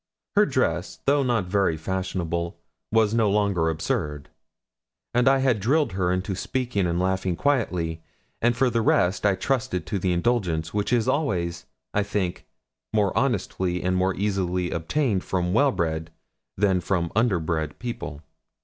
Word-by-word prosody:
Her - - +5
dress, - - 0
though 140 +1 +4
not 120 -7 +1
very 90 -3 +1
fashionable, 85 -1 -3 0.3
was 110 -1 +3
no 115 -2 +3
longer 100 -5 +2
absurd. 75 -2 -2 0.8
And 125 +1 +3
I 135 - +5
had 130 -5 +2
drilled 135 +6 +2
her 90 -1 0
into 95 +2 -1
speaking 120 -2 -1
and 85 0 0
laughing 95 -1 0
quietly; 90 - 0 0.4
and 120 0 +2
for 130 -1 +3
the 115 0 +1
rest 100 -1 +2
I 100 - +3
trusted 115 -5 -1
to 100 - -2
the 90 0 0
indulgence 85 -5 0
which 105 +2 -1
is 120 -3 +2
always, 85 - -1 0.3
I 105 - +2
think, 100 -3 -2 0.4
more 105 -3 +1
honestly 95 -7 0
and 90 0 +1 0.2
easily 90 -3 0
obtained 100 - 0
from 90 -1 -1
well 140 +5 +4
bred 80 -3 -2 0.5
than 95 -2 +2
from 85 -2 -1
under 110 -4 +3
bred 80 -2 -2
people. 115 - -6
95 Hz, 150 wpm, -25 LUFS, 85-115 Hz, 0.8 s, Her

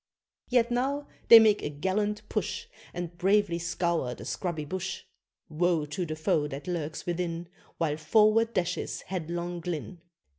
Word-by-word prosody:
Yet 245 -1 +3
now 275 +4 0 0.2
they 230 - +12
make 215 -2 +5
a - - -2
gallant 205 +7 -1
push, 465 - -2 0.3
And 175 -1 -5
bravely 195 -2 +3
scour 170 -6 -1
the - - -10
scrubby 170 -5 -3
bush. 185 +4 -4 0.4
Woe 165 0 +1
to 160 +4 -3
the 155 - -3
foe 155 -1 +1
that 140 +1 -7
lurks 160 -4 -3
within, 170 -1 -3 0.3
While 150 -2 0
forward 215 +8 +4
dashes 180 -3 -1
headlong 175 -1 -4
Glynn. 170 +1 -5
175 Hz, 145 wpm, -28 LUFS, 160-205 Hz, 0.4 s, they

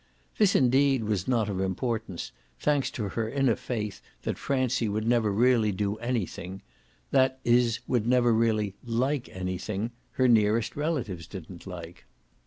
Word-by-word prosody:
This 205 -2 +4
indeed 135 0 +4
was 105 -4 -1
not 115 -4 +2
of 100 -3 -2
importance, 95 0 -2 0.3
thanks 145 -2 +1
to 105 -4 -4
her 110 +2 -2
inner 135 -3 +2
faith 110 -5 -4 0.2
that - - -3
Francie 130 -4 0
would 105 +2 -1
never 115 -3 +3
really 115 0 +3
do 100 +2 -1
anything 110 -5 -3 0.5
that 130 -1 +3
is 120 -1 +3
would 115 -3 +1
never 120 -1 +4
really 110 -3 +1
like 125 +3 -1
anything 95 +4 -3 0.2
her 130 - +3
nearest 110 -1 +3
relatives 125 - -2
didn't 90 -1 -9
like. 85 -2 -9
115 Hz, 145 wpm, -28 LUFS, 100-125 Hz, 0.5 s, This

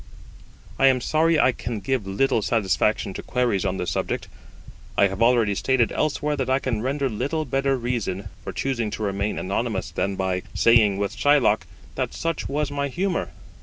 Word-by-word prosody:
I 135 - +6
am 130 -1 +4
sorry 155 +5 +2
I - - +5
can 115 -2 -5
give 105 0 -2
little 115 +5 +1
satisfaction 105 -1 +1
to - - -6
queries 125 -6 0
on 95 0 -1
this 90 - -2
subject. - - -2 0.7
I - - +6
have 95 +3 -6
already 115 -3 +4
stated 125 +3 +1
elsewhere 150 0 0
that 130 -2 -2
I 130 - +4
can 130 -5 -2
render 135 +3 0
little 140 +7 -2
better 135 0 +1
reason 110 -6 -3
for - - -5
choosing 120 -5 -2
to 110 - -4
remain 100 +1 -1
anonymous 100 -2 -2
than 100 +4 -1
by 95 -1 -1
saying 110 -4 +5
with 100 0 -2
Shylock, 140 -7 +3 0.3
that - - -3
such 165 -1 -2
was 145 +1 -1
my 140 0 -1
humour. 180 +6 -1
120 Hz, 175 wpm, -24 LUFS, 100-135 Hz, 0.7 s, I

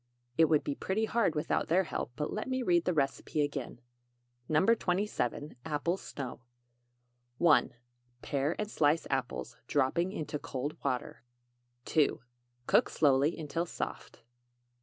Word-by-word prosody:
It 165 - +6
would 155 -2 +3
be 145 - -1
pretty 195 +9 -1
hard 220 -7 +1
without 150 - 0
their 180 +4 +4
help; 140 - -4
but 150 +2 -3
let 215 +4 -3
me 260 0 0
read 175 -5 +3
the 180 - +2
recipe 140 +1 0
again: 140 -4 -4 0.7
NO. 155 +4 +3
27. 180 - -1
APPLE 160 +3 -1
SNOW. 135 -10 -7 1.0
1. 160 -6 +4 0.5
Pare 140 +3 0
and 210 0 -3
slice 150 +2 +2
apples, 125 -3 -2
dropping 150 +6 +1
into 150 -6 -4
cold 140 +3 -4
water. 130 -3 -2 0.6
2. 155 -3 +2 0.5
Cook - - +4
slowly 140 +1 +3
until 165 +2 -2
soft. - - -6
155 Hz, 135 wpm, -31 LUFS, 140-175 Hz, 1.0 s, It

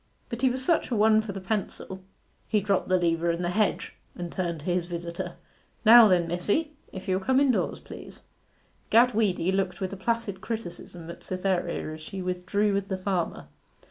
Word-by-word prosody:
But 235 -1 -5
he 260 - +4
was 255 +1 -3
such 335 +1 +2
a 245 - 0
one 215 +1 +5
for 215 -2 -6
the 195 - -6
pencil.' 190 -1 -4 0.5
He 215 - +2
dropped 200 -2 0
the 185 - +4
lever 170 -1 +1
in 170 +1 -1
the 175 - 0
hedge, 210 +2 0 0.2
and 175 -1 -5
turned 170 -4 -3
to - - -12
his 175 -1 0
visitor. 175 +1 -5 0.5
'Now 230 +1 +10
then, 175 -3 +3
missie, 205 - 0 0.2
if 190 -1 -8
you'll 185 0 +1
come 260 +7 +2
indoors, 275 -4 +1
please.' - - -11 0.7
Gad 240 +2 +5
Weedy 190 -4 +1
looked 190 -1 -1
with 190 0 -3
a - - -6
placid 220 -2 -2
criticism 175 -6 -6
at - - -11
Cytherea 180 -4 -2
as 155 - -9
she 190 +5 -7
withdrew 185 +3 0
with 195 0 -1
the 190 - -2
farmer. 185 -2 -2
190 Hz, 190 wpm, -27 LUFS, 175-215 Hz, 0.7 s, Now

